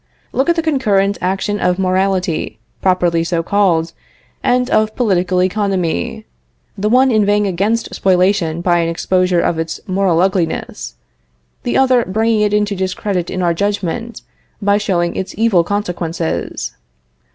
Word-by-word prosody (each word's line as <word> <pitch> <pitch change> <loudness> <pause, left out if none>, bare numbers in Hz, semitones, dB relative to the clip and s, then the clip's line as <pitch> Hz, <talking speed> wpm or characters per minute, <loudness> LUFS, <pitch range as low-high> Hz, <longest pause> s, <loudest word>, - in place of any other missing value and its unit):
Look 270 +5 +1
at 340 - +3
the 330 - -1
concurrent 205 -10 +1
action 195 +3 -1
of 180 0 +1
morality, 185 - 0 0.2
properly 175 -3 +2
so 165 0 -1
called, 170 -4 +1 0.5
and 250 0 +1
of 215 0 +2
political 185 -5 +1
economy 185 - -1 0.5
the 210 +2 -1
one 255 +3 +4
inveighing 210 -1 +2
against 200 +5 -1
spoliation 180 -3 +1
by 175 -1 +2
an 165 -1 0
exposure 180 +1 +1
of 165 - 0
its 165 0 -3
moral 185 -3 +1
ugliness, 180 -3 -1 0.7
the 245 - -1
other 260 -2 +4
bringing 220 +2 +1
it 210 -1 +2
into 210 -1 +1
discredit 185 -1 -2
in 185 -1 -3
our 170 -1 +2
judgment, 205 +4 -3 0.4
by 205 0 +2
showing 175 -4 -1
its 190 - -4
evil 215 -6 +3
consequences. 175 -4 -3
190 Hz, 140 wpm, -16 LUFS, 175-210 Hz, 0.7 s, one